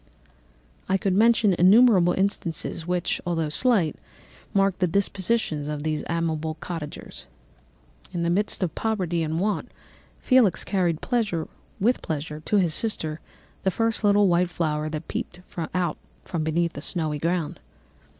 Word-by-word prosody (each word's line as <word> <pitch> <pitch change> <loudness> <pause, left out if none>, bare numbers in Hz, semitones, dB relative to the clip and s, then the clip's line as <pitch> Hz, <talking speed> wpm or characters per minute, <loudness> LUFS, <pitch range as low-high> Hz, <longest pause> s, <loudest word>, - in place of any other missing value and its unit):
"I 190 - +3
could 195 -1 0
mention 220 0 +4
innumerable 190 -1 +6
instances 175 -4 -2
which, 180 -1 -1
although 165 -3 -1
slight, 190 -3 +2 0.5
marked 195 -2 +2
the 180 - +3
dispositions 190 -4 0
of 150 -1 -4
these 155 -1 -1
amiable 160 -2 -1
cottagers. 150 - -7 0.8
In 175 -2 -2
the 170 - +1
midst 205 +1 0
of 175 - -1
poverty 185 -7 -1
and 160 +1 -1
want, 205 +2 -1 0.5
Felix 245 -9 +3
carried 175 -5 0 0.7
with 240 +6 +2
pleasure 150 -1 -4
to 160 - -2
his 175 -5 +2
sister 160 -7 -1 0.4
the 190 - +2
first 225 +3 0
little 205 0 +5
white 175 0 +2
flower 155 -3 -1
that 155 +1 -5
peeped 180 - -5 0.3
out 175 -3 0 0.3
from 165 -3 -3
beneath 170 +2 0
the 145 - -7
snowy 155 -3 -1
ground. 165 0 -1
175 Hz, 140 wpm, -25 LUFS, 160-195 Hz, 0.8 s, innumerable